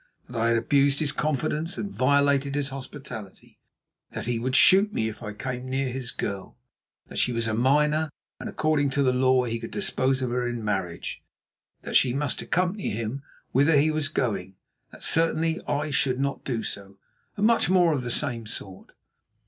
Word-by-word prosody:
That 125 Hz, -, -11 dB
I 115 Hz, -, +3 dB
had 115 Hz, 0 st, +3 dB
abused 140 Hz, +4 st, +3 dB
his 150 Hz, -3 st, +1 dB
confidence 155 Hz, +3 st, -1 dB
and 200 Hz, -, -4 dB
violated 140 Hz, +1 st, +2 dB
his 145 Hz, -1 st, 0 dB
hospitality; 130 Hz, -6 st, -9 dB, 0.5 s
that -, -, -4 dB
he 120 Hz, -1 st, -1 dB
would 130 Hz, +2 st, -1 dB
shoot 190 Hz, -, +6 dB
me 110 Hz, -, -1 dB
if 110 Hz, 0 st, -7 dB
I 105 Hz, -2 st, -5 dB
came 125 Hz, +3 st, -5 dB
near 135 Hz, 0 st, -1 dB
his 125 Hz, -1 st, -4 dB
girl. 100 Hz, -2 st, -5 dB, 0.5 s
That -, -, -5 dB
she 125 Hz, -, +2 dB
was 115 Hz, -1 st, -1 dB
a 110 Hz, -, -1 dB
minor, 150 Hz, +6 st, +2 dB, 0.3 s
and -, -, -5 dB
according 155 Hz, -2 st, +1 dB
to 140 Hz, -, +4 dB
the 130 Hz, -1 st, +3 dB
law 130 Hz, 0 st, +3 dB
he 115 Hz, -1 st, -2 dB
could -, -, -7 dB
dispose 135 Hz, -10 st, 0 dB
of 125 Hz, -, -2 dB
her 125 Hz, 0 st, 0 dB
in 120 Hz, -2 st, -4 dB
marriage. 95 Hz, -5 st, -3 dB, 0.6 s
That -, -, -5 dB
she 125 Hz, -1 st, +4 dB
must 145 Hz, +1 st, -1 dB
accompany 185 Hz, +3 st, -1 dB
him 115 Hz, +5 st, -3 dB, 0.3 s
whither 145 Hz, +4 st, +4 dB
he 155 Hz, +3 st, +4 dB
was 155 Hz, -2 st, +1 dB
going; 100 Hz, -10 st, -2 dB, 0.4 s
that -, -, -14 dB
certainly 165 Hz, 0 st, +2 dB
I 145 Hz, +1 st, -1 dB
should 130 Hz, -2 st, +1 dB
not 140 Hz, 0 st, -2 dB
do 120 Hz, -4 st, -2 dB
so, 100 Hz, -1 st, -6 dB, 0.4 s
and 205 Hz, -, +2 dB
much 230 Hz, -4 st, +3 dB
more 175 Hz, -3 st, +4 dB
of 140 Hz, -, -1 dB
the 125 Hz, -, -4 dB
same 115 Hz, -2 st, 0 dB
sort. 95 Hz, -3 st, -6 dB
130 Hz, 190 wpm, -26 LUFS, 115-150 Hz, 0.6 s, shoot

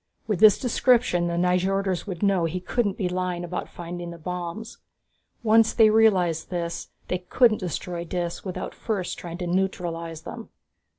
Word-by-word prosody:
With 210 Hz, -5 st, -1 dB
this 215 Hz, -2 st, +8 dB
description, 240 Hz, -7 st, +2 dB
the 170 Hz, 0 st, -2 dB
Nyjorders 185 Hz, +1 st, +1 dB
would 185 Hz, -1 st, -5 dB
know 195 Hz, -4 st, +3 dB
he 165 Hz, +3 st, -2 dB
couldn't 200 Hz, +2 st, -1 dB
be 190 Hz, -, 0 dB
lying 180 Hz, -1 st, -2 dB
about 175 Hz, +1 st, -4 dB
finding 175 Hz, 0 st, -7 dB
the 170 Hz, -, -8 dB
bombs. 180 Hz, +6 st, -6 dB, 0.6 s
Once 225 Hz, 0 st, +5 dB
they 220 Hz, -2 st, +6 dB
realized 190 Hz, -7 st, +3 dB
this, 170 Hz, -2 st, -4 dB, 0.2 s
they 180 Hz, -, -1 dB
couldn't 215 Hz, +5 st, +3 dB
destroy 175 Hz, -1 st, -4 dB
Dis 175 Hz, 0 st, -3 dB
without 185 Hz, -2 st, -5 dB
first 200 Hz, -6 st, -3 dB
trying 170 Hz, -1 st, -7 dB
to 180 Hz, -, -4 dB
neutralize 170 Hz, -3 st, -2 dB
them. -, -, -8 dB
180 Hz, 160 wpm, -25 LUFS, 175-205 Hz, 0.6 s, this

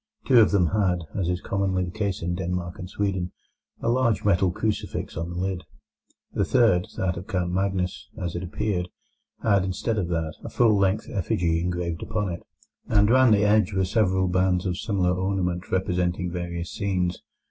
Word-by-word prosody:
Two 125 Hz, -3 st, +6 dB
of 110 Hz, -, +6 dB
them 90 Hz, -5 st, +3 dB
had, 90 Hz, -4 st, +1 dB
as 90 Hz, -3 st, -1 dB
is 90 Hz, 0 st, -1 dB
commonly 95 Hz, -2 st, 0 dB
the 90 Hz, -, -6 dB
case 100 Hz, -3 st, -2 dB
in 90 Hz, +1 st, -1 dB
Denmark 90 Hz, 0 st, -3 dB
and 90 Hz, -1 st, -6 dB
Sweden, 95 Hz, -3 st, -2 dB, 0.5 s
a -, -, -2 dB
large 115 Hz, -3 st, +2 dB
metal 95 Hz, -2 st, +3 dB
crucifix 105 Hz, +4 st, -3 dB
on 85 Hz, +2 st, -3 dB
the 85 Hz, -, -6 dB
lid. 95 Hz, 0 st, -2 dB, 0.7 s
The -, -, +1 dB
third, 110 Hz, -5 st, +3 dB
that 90 Hz, -2 st, 0 dB
of 90 Hz, -, -7 dB
Count 90 Hz, -2 st, -1 dB
Magnus, 95 Hz, -1 st, -1 dB
as 85 Hz, -1 st, -3 dB
it 85 Hz, -, -2 dB
appeared, 90 Hz, 0 st, -2 dB, 0.6 s
had, 100 Hz, -4 st, +3 dB
instead 100 Hz, +4 st, -1 dB
of 90 Hz, -, -1 dB
that, 80 Hz, -2 st, -2 dB
a -, -, -5 dB
full 115 Hz, -3 st, +4 dB
length 100 Hz, 0 st, +1 dB
effigy 85 Hz, -3 st, 0 dB
engraved 85 Hz, -1 st, -2 dB
upon 105 Hz, -3 st, -2 dB
it, 85 Hz, -, -5 dB, 0.5 s
and 105 Hz, 0 st, +4 dB
round 130 Hz, -3 st, +6 dB
the 105 Hz, 0 st, +2 dB
edge 105 Hz, -2 st, +3 dB
were 95 Hz, 0 st, +1 dB
several 95 Hz, -2 st, +2 dB
bands 90 Hz, 0 st, +1 dB
of 90 Hz, -1 st, -1 dB
similar 95 Hz, -4 st, +1 dB
ornament 90 Hz, -1 st, -1 dB
representing 90 Hz, -1 st, 0 dB
various 85 Hz, -1 st, -4 dB
scenes. 90 Hz, -3 st, -1 dB
95 Hz, 180 wpm, -25 LUFS, 90-100 Hz, 0.7 s, Two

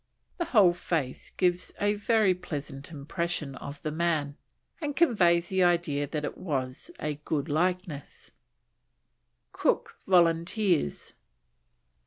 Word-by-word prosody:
The 345 Hz, -, +1 dB
whole 205 Hz, -, +5 dB
face 160 Hz, -7 st, -3 dB
gives 180 Hz, -1 st, +1 dB
a 205 Hz, 0 st, +2 dB
very 210 Hz, -1 st, +3 dB
pleasant 145 Hz, -5 st, -6 dB
impression 155 Hz, -1 st, -3 dB
of 140 Hz, +1 st, -8 dB
the 155 Hz, -, -2 dB
man, 155 Hz, -3 st, 0 dB, 0.5 s
and 290 Hz, -2 st, -2 dB
conveys 175 Hz, -, +4 dB
the 190 Hz, -1 st, +2 dB
idea 170 Hz, -5 st, +2 dB
that 150 Hz, +1 st, -3 dB
it -, -, -6 dB
was 135 Hz, -, -3 dB
a 150 Hz, -1 st, -3 dB
good 150 Hz, -2 st, -1 dB
likeness. 170 Hz, -1 st, -2 dB, 1.2 s
COOK -, -, 0 dB
VOLUNTEERS. 175 Hz, -, +2 dB
170 Hz, 115 wpm, -28 LUFS, 145-185 Hz, 1.2 s, whole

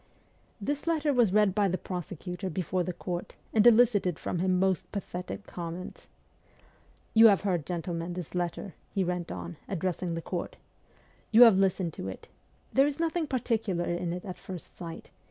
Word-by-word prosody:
This 290 Hz, +9 st, -3 dB
letter 310 Hz, -3 st, +2 dB
was 240 Hz, -6 st, +4 dB
read 210 Hz, -1 st, +4 dB
by 205 Hz, 0 st, +3 dB
the 185 Hz, 0 st, 0 dB
prosecutor 180 Hz, +1 st, -5 dB
before 185 Hz, +1 st, -1 dB
the 180 Hz, -, -2 dB
court, 175 Hz, 0 st, -5 dB, 0.2 s
and 220 Hz, +1 st, +6 dB
elicited 220 Hz, -7 st, +5 dB
from 175 Hz, -, -3 dB
him 185 Hz, 0 st, +2 dB
most 185 Hz, -1 st, +1 dB
pathetic 195 Hz, 0 st, -5 dB
comments: 175 Hz, +1 st, -7 dB, 0.5 s
' -, -, -32 dB
You 225 Hz, 0 st, +9 dB
have 200 Hz, -3 st, +5 dB
heard, 180 Hz, -7 st, -1 dB
gentlemen, 175 Hz, -1 st, -3 dB
this 175 Hz, -3 st, -6 dB
letter 180 Hz, +2 st, -3 dB
' -, -, -36 dB
he 195 Hz, -, +2 dB
went 180 Hz, -1 st, -2 dB
on, 85 Hz, -1 st, -6 dB
addressing 180 Hz, -1 st, -2 dB
the 165 Hz, -, -3 dB
court. 175 Hz, -2 st, -4 dB, 0.4 s
' -, -, -33 dB
You 230 Hz, +2 st, +9 dB
have 220 Hz, -5 st, +7 dB
listened 185 Hz, -3 st, +1 dB
to 95 Hz, -, -6 dB
it. 95 Hz, -, -8 dB, 0.4 s
There 270 Hz, +2 st, +5 dB
is 290 Hz, 0 st, -3 dB
nothing 330 Hz, -1 st, 0 dB
particular 220 Hz, -9 st, 0 dB
in 175 Hz, 0 st, -2 dB
it 180 Hz, +2 st, -5 dB
at 185 Hz, -2 st, -7 dB
first 185 Hz, -3 st, -9 dB
sight. 165 Hz, -2 st, -8 dB
185 Hz, 180 wpm, -29 LUFS, 175-215 Hz, 0.5 s, You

